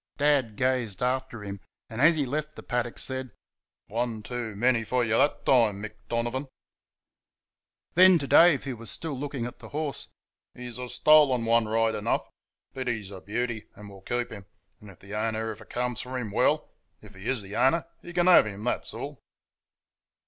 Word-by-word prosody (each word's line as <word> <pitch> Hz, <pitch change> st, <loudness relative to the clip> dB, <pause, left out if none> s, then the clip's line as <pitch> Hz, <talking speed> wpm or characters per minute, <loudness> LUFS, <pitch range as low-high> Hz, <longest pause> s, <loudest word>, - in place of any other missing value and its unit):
Dad 140 Hz, -7 st, +2 dB
gazed 125 Hz, -5 st, 0 dB
after 125 Hz, -3 st, -1 dB
him, 100 Hz, -1 st, -6 dB, 0.3 s
and, 110 Hz, +2 st, -5 dB
as 160 Hz, +3 st, +6 dB
he 145 Hz, -3 st, 0 dB
left 150 Hz, +3 st, -3 dB
the -, -, -10 dB
paddock, 120 Hz, -1 st, -2 dB
said: 130 Hz, -1 st, -3 dB, 0.6 s
"One 115 Hz, -1 st, -3 dB
too 120 Hz, -2 st, -5 dB
many 120 Hz, +2 st, +2 dB
f' 110 Hz, -, -11 dB
y' 125 Hz, -1 st, +3 dB
that 115 Hz, +7 st, +2 dB
time, 115 Hz, -6 st, +4 dB
Mick 110 Hz, -, -5 dB, 0.2 s
Donovan!" 120 Hz, +4 st, -2 dB, 1.5 s
Then 185 Hz, +1 st, +8 dB
to 145 Hz, -, -3 dB
Dave, 165 Hz, 0 st, +6 dB
who 135 Hz, -3 st, -4 dB
was 115 Hz, -1 st, -6 dB
still 155 Hz, -, -3 dB
looking 140 Hz, -2 st, -4 dB
at 120 Hz, -, -8 dB
the -, -, -11 dB
horse: 150 Hz, -1 st, -3 dB, 0.5 s
"He's 125 Hz, -1 st, -8 dB
a 125 Hz, -1 st, -5 dB
stolen 145 Hz, -6 st, +5 dB
one 115 Hz, -1 st, +3 dB
right 115 Hz, +1 st, +2 dB
enough, 105 Hz, +2 st, -1 dB, 0.5 s
but 130 Hz, -1 st, -5 dB
he's 110 Hz, -5 st, -3 dB
a 95 Hz, -2 st, -9 dB
beauty, 110 Hz, +2 st, -3 dB
and 105 Hz, -1 st, -11 dB
we'll 95 Hz, -1 st, -13 dB
keep 120 Hz, +4 st, -2 dB
him; 100 Hz, -2 st, -10 dB, 0.3 s
and 105 Hz, -, -13 dB
if 95 Hz, -, -14 dB
the 100 Hz, +1 st, -12 dB
owner 110 Hz, +1 st, -1 dB
ever 110 Hz, 0 st, -11 dB
comes 125 Hz, 0 st, -2 dB
for 130 Hz, +1 st, -5 dB
him, 115 Hz, -5 st, -4 dB
well -, -, +1 dB, 0.3 s
if -, -, -14 dB
he 95 Hz, +4 st, -9 dB
is 125 Hz, -6 st, -1 dB
the 100 Hz, +2 st, -8 dB
owner 155 Hz, +8 st, +3 dB, 0.2 s
he 175 Hz, -, -10 dB
can 175 Hz, 0 st, +1 dB
have 180 Hz, -11 st, +7 dB
him, 100 Hz, 0 st, -7 dB
that's 120 Hz, -2 st, -2 dB
all." 140 Hz, +3 st, -6 dB
120 Hz, 190 wpm, -27 LUFS, 110-135 Hz, 1.5 s, Then